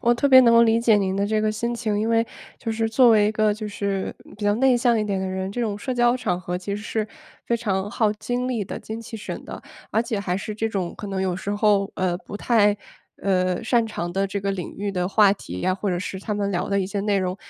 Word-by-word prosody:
我 240 -1 +3
特 260 - +1
别 260 -2 +9
能 235 -2 +5
够 230 - +7
理 225 0 +3
解 225 -3 +4
您 190 -1 0
的 200 +1 0
这 215 0 0
个 215 0 +1
心 235 +2 -2
情， 215 -3 -1
因 220 - 0
为 230 0 +2 0.3
就 225 - -3
是 225 0 0
作 240 +2 +5
为 210 -2 +5
一 - - -1
个 215 -1 +2
就 215 0 -5
是 200 -2 -3 0.2
比 210 - -9
较 205 0 +3
内 255 +2 +4
向 240 -1 +3
一 215 - 0
点 195 -2 -1
的 190 - -2
人， 190 +1 -3
这 245 - -3
种 210 -3 -2
社 255 +4 -3
交 240 0 +3
场 180 -8 -2
合 180 0 -3
其 200 +2 -4
实 210 - -5
是 220 -1 -2 0.4
非 235 - 0
常 205 -4 -1
耗 220 -2 +2
精 245 +3 -3
力 230 -6 -1
的 - - -6
精 220 +1 -6
气 230 0 -8
神 - - -6
的。 - - -8 0.3
而 225 - +2
且 230 -4 -3
还 180 -3 -2
是 210 +2 -5
这 220 +1 -1
种 185 -4 -3
可 205 - -7
能 190 -1 -2
有 185 -2 0
时 200 - -4
候， 205 -1 +2
呃， 185 -2 0
不 190 - -11
太， 210 -2 +3 0.5
呃， 185 0 +1
擅 230 0 +2
长 175 -5 -4
的 195 +2 0
这 195 +1 -3
个 200 - -1
领 190 -3 -5
域 200 0 -2
的 180 -2 -1
话 200 0 +5
题 90 - -8
呀， 185 - +1
或 195 0 -2
者 175 - -1
是 190 +1 -5
他 210 +2 -4
们 205 -1 -1
聊 180 +1 -2
的 200 0 +2
一 185 - -1
些 200 +1 -3
内 205 -1 +1
容， 185 0 -2
205 Hz, 300 characters per minute, -23 LUFS, 195-225 Hz, 0.5 s, 别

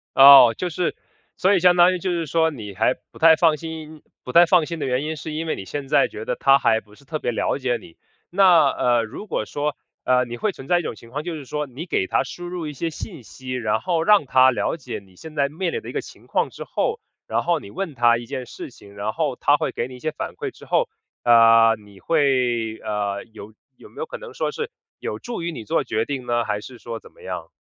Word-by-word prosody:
哦， 135 -4 +10
就 180 - -2
是 175 +1 -2 0.4
所 195 +2 +3
以 - - +3
相 180 0 +5
当 175 +1 +6
于 180 - -3
就 185 +1 -2
是 170 -2 -1
说 160 +2 +2
你 105 -8 -8
还 - - +2 0.2
不 - - -15
太 160 0 +7
放 160 -2 +3
心， 160 -1 -8 0.2
不 125 - -6
太 170 +4 +7
放 170 -2 +4
心 170 +1 -5
的 140 - -2
原 130 +2 0
因 160 +1 -3
是 155 0 -7
因 160 +2 -3
为 - - -1
你 95 - -8
现 140 +6 -5
在 150 - +4
觉 110 - -8
得 - - -1
它 135 0 +4
还 110 - +3
不 105 +1 -22
是 140 - -20
特 155 +3 -4
别 120 - -1
了 - - -1
解 130 -3 -1
你。 85 - -16 0.3
那， 175 -6 +5
呃， 120 -3 +1
如 115 - -8
果 165 - -2
说 145 +4 -3 0.3
呃， 125 0 +3
你 120 0 -7
会 215 - 0
存 135 -7 -12
在 175 - +3
一 - - -2
种 120 - -4
情 115 +2 -15
况， 145 +5 -4
就 170 -1 -4
是 145 - -8
说 150 +3 -3
你 140 +5 -8
给 95 - 0
它 - - +1
输 175 - -8
入 175 -3 -5
一 150 - -6
些 165 +4 -3
信 160 - -8
息， 130 +3 -10
然 115 -4 0
后 170 +3 0
让 205 -3 +5
它 130 0 +5
了 125 - -1
解 125 -8 -6
你 95 -2 -22
现 155 - -11
在 140 -1 +1
面 170 +5 -3
临 460 - -2
的 - - -9
一 - - -5
个 - - -2
情 - - -15
况 - - 0
之 - - -8
后， 460 0 -2 0.3
然 - - 0
后 170 -1 +1
你 100 - -12
问 185 -4 -4
它 120 -1 +4
一 120 - -7
件 130 +1 -5
事 125 - -9
情， 100 -5 -16
然 105 +2 -3
后 150 -5 -1
它 145 +3 +3
会 - - -2
给 120 - -3
你 130 - -11
一 - - -12
些 155 +4 -2
反 - - -6
馈 - - -5
之 - - -15
后， - - +1 0.3
呃， 115 -1 +6
你 100 -1 -17
会 125 -7 +1
呃， 100 -2 -3
有 110 0 -11 0.2
有 - - -15
没 - - -24
有 475 - -3
可 - - -7
能 485 -1 -10
说 - - -1
是 460 0 -4 0.3
有 - - -4
助 240 -6 -6
于 170 +1 -2
你 120 - -7
做 105 - 0
决 110 +1 -1
定 135 -4 -5
呢？ 120 0 +1
还 105 -1 -2
是 125 +3 -11
说 115 -1 -7
怎 - - -17
么 - - -21
样？ - - -6
140 Hz, 285 characters per minute, -22 LUFS, 120-165 Hz, 0.4 s, 哦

